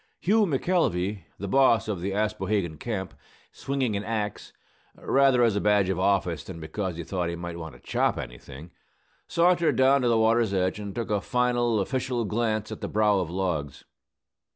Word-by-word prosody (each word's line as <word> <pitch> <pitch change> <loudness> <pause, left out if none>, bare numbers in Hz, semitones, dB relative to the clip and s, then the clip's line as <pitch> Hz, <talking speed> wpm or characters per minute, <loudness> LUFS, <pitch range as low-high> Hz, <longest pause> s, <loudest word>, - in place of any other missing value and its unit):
Hughey 210 +3 +3
McElvey, 105 - 0
the 100 - -5
boss 130 -1 +3
of 100 -5 -3
the 95 +2 -2
Aspohegan 105 -5 -1
camp, 100 -6 -4 0.4
swinging 135 -5 -2
an 100 - -2
axe 105 -2 -4 0.4
(rather 135 -2 +3
as 115 -3 +3
a 100 - 0
badge 105 -2 +3
of 95 -2 -1
office 90 -5 +1
than 85 0 -9
because 85 +2 -4
he 85 - -4
thought 90 0 -2
he 85 - -3
might 85 0 -6
want 80 -6 -8
to - - -15
chop - - 0
anything), 65 +6 -9 0.6
sauntered 170 0 +3
down 135 +1 +4
to 125 - +1
the 115 -1 +3
water's 110 -2 +2
edge 95 +2 0
and 100 -1 -6
took 115 -3 -3
a 105 -1 +1
final 120 -2 +1
official 125 +2 -1
glance 110 0 -1
at 110 - -7
the - - -3
brow 105 -1 +2
of 90 -3 -2
logs. 85 -6 -3
105 Hz, 180 wpm, -26 LUFS, 90-120 Hz, 0.6 s, down